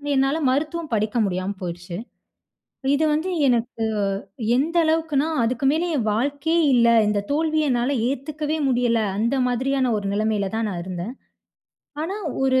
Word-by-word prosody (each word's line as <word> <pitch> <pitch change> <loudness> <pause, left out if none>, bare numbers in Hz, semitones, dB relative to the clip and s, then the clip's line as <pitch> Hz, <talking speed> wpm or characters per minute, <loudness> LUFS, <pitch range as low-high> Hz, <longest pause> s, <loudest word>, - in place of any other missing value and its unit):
என்னால 270 +3 +2
மருத்துவம் 310 +4 -1
படிக்க 215 +2 0
முடியாம 185 +1 -2
போயிருச்சு. 175 0 -5 1.0
இது 310 +2 +2
வந்து 320 +5 0 0.2
எனக்கு 235 -1 0 0.7
எந்த 320 +6 0
அளவுக்குனா, 315 -2 +1 0.2
அதுக்கு 255 +3 0
மேலே 335 +3 0
என் 225 -4 -1
வாழ்க்கையே 285 +8 0
இல்ல! 235 -1 +5 0.2
இந்த 205 -1 +1
தோல்விய 310 -1 +1
என்னால 245 +3 +1
ஏததுக்கவே 300 +3 -3
முடியல! 240 -2 +2 0.2
அந்த 235 +5 +1
மாதிரியான 260 0 0
ஒரு 200 - -5
நிலைமையில 210 -1 0
தான் 225 -1 0
நான் 175 -2 -4
இருந்தேன். 185 +6 -5 0.9
ஆனா 380 +5 -3 0.3
ஒரு 260 -1 +3
260 Hz, 140 wpm, -23 LUFS, 220-305 Hz, 1.0 s, இல்ல